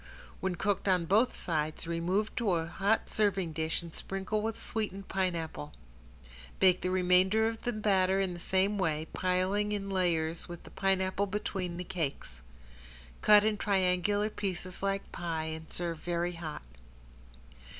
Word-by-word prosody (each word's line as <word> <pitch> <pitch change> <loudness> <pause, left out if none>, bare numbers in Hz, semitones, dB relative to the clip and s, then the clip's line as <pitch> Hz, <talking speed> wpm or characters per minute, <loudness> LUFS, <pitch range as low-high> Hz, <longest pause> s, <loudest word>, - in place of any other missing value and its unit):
When 190 -1 -1
cooked 200 +3 0
on 180 -3 +3
both 215 +8 +3
sides 155 -3 -1
remove 175 +6 0
to 220 -6 +2
a 165 -1 +1
hot 195 +6 +1
serving 195 -6 +1
dish 160 +2 -1
and 165 -1 -9
sprinkle 195 +2 -2
with 220 0 -3
sweetened 200 -3 -3
pineapple. 165 - -2 0.9
Bake 185 -1 +5
the 185 - 0
remainder 185 +4 +4
of 225 0 -3 0.2
batter 190 -2 +3
in 190 -2 0
the 175 - -8
same 190 +3 +1
way, 160 -4 0
piling 185 +3 +1
in 195 -1 -3
layers 170 -4 0
with 175 -1 -8
the - - -13
pineapple 195 +1 +1
between 190 -3 -3
the 180 - -3
cakes. 155 - -4 0.8
Cut 210 -1 +7
in 215 0 +1
triangular 200 +1 +1
pieces 185 -3 -4
like 195 0 -1
pie 165 -2 -3
and 160 0 -6
serve 170 -2 -3
very 175 +1 -1
hot. 165 - -6
185 Hz, 150 wpm, -31 LUFS, 170-200 Hz, 0.9 s, Cut